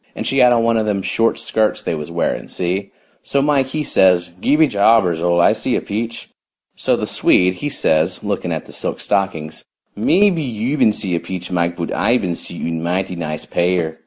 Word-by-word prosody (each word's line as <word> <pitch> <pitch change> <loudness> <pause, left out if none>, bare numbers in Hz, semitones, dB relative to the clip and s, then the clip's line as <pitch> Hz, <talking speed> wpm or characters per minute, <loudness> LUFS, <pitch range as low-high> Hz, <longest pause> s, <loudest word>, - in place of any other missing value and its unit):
And - - -5
she 135 - +1
had 125 -1 +6
on 115 -1 +3
one 115 0 +2
of 110 -1 0
them 100 -2 -1
short 115 +4 +1
skirts 110 -1 0
they - - -2
was 75 -1 -5
wearing, 85 0 -2
see? 95 +3 -3 0.3
So 140 - 0
Mike 140 -2 +2
he 150 +3 -3
says 90 -8 +3
'Gee 145 - +3
be 160 +1 +5
jabbers, 100 - +3
Ole, 85 0 +2
I - - +5
see - - -1
a - - 0
peach.' 115 +3 -4 0.5
So - - +1
the - - -3
Swede 90 0 +2
he 145 +10 -4
says 80 - 0
lookin' - - -2
at - - -3
the - - -12
silk - - -3
stockings, 80 -6 -2 0.3
'Mebby 180 - +3
you 125 0 -2
ban 110 - +5
see 95 -3 0
a 85 - +1
peach, 90 0 -7
Mike, 85 -1 0
but 85 -1 -4
I 120 +3 +2
ban 95 -7 -2
see - - -6
one 80 -1 -2
mighty 90 +2 -2
nice 75 -3 -5
pair.' 85 -2 -1
95 Hz, 215 wpm, -18 LUFS, 85-115 Hz, 0.5 s, had